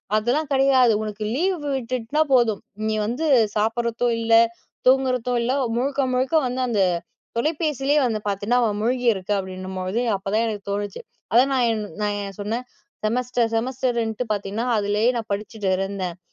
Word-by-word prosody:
அதெல்லாம் 250 +8 +1
கிடையாது 265 -3 +5
உனக்கு 215 0 -5
லீவ் 365 +5 +1 0.2
விட்டுட்டுனா 255 +3 -1
போதும் 235 -5 +3 0.3
நீ 220 - 0
வந்து 245 +9 -2 0.3
சாப்பிடுறதும் 235 +2 0
இல்ல 230 0 +1 0.5
தூங்குறதும் 255 -2 +3
இல்ல. 235 +2 0 0.3
முழுக்க 275 +2 0
முழுக்க 260 +5 +1
வந்து 250 +1 -2
அந்த 215 -5 +1 0.6
தொலைபேசிலே 300 0 +1
வந்து 225 -3 0
பார்த்தீன்னா. 205 +5 0
அவ 225 - +2
மூழ்கியிருக்க 230 -5 +1
அப்டின்னும்போது. 185 +2 -4 0.2
அப்பதான் 200 +4 0
எனக்கு 210 -2 -4
தோணுச்சு 205 -1 -3 0.3
அதான் 255 +4 +5
நான் 250 -2 +3
என் 215 -1 -2 0.2
நான் 205 -1 0
என் 195 -1 -8
சொன்னேன். 230 +5 -3 0.4
செமஸ்டர் 240 +1 0
செமஸ்டர்ன்ட்டு 240 -1 -1
பார்த்தின்னா, 205 +2 -3
அதுலயே 210 +3 +2
நான் 225 -2 -5
படிச்சுட்டு 210 0 -3
இருந்தேன். 190 -3 -3
230 Hz, 140 wpm, -23 LUFS, 210-255 Hz, 0.6 s, கிடையாது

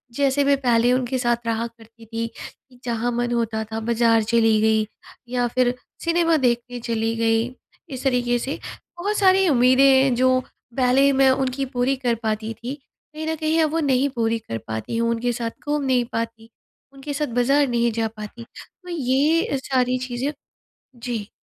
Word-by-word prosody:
जैसे 280 0 +2
मैं 280 0 +4
पहले 240 -1 +3
उनके 255 0 0
साथ 240 -1 0
रहा 230 +1 -1
करती 230 0 -18
थी 230 +1 -3
कि 250 -2 -13
जहाँ 240 0 -1
मन 240 0 -1
होता 230 -2 -1
था 225 - -2
बाज़ार 230 0 +2
चली 225 -1 +3
गई 220 0 +3 0.5
या 245 -1 +1
फिर 245 +1 +1 0.3
सिनेमा 335 -1 +2
देखने 245 -2 0
चली 225 -1 -1
गई। 225 0 +2 0.5
इस 255 - -7
तरीके 245 -2 +1
से 270 +4 -4 0.4
बहुत 410 +4 -1
सारी 380 -1 +4
उम्मीदें 255 0 +4
हैं 265 -1 +5
जो 255 +1 +3 0.4
पहले 265 +2 +4
मैं 270 0 +4
उनकी 265 0 -1
पूरी 255 +2 +2
कर 245 -3 0
पाती 220 0 -2
थी 240 +5 -6 0.4
कहीं 315 +1 -5
न 320 - 0
कहीं 315 +1 +1
अब 305 - 0
वो 330 - 0
नहीं 275 -2 +2
पूरी 225 -1 0
कर 115 - -6
पाती 110 - -4
हूँ 230 0 +1
उनके 235 +1 -1
साथ 230 -1 -3 0.2
घूम 295 -1 0
नहीं 255 -2 +2
पाती 225 0 -4 0.4
उनके 275 +1 -6
साथ 300 +1 -1
बाज़ार 275 +4 +3
नहीं 235 -1 +1
जा 225 0 -1
पाती 215 +2 -8
तो 360 +9 -15
ये 300 +1 +2
अ, - - -2
सारी 255 -1 0
चीज़ें 250 +4 -2 0.6
जी। 230 -3 -5
245 Hz, 180 wpm, -22 LUFS, 230-270 Hz, 0.6 s, हैं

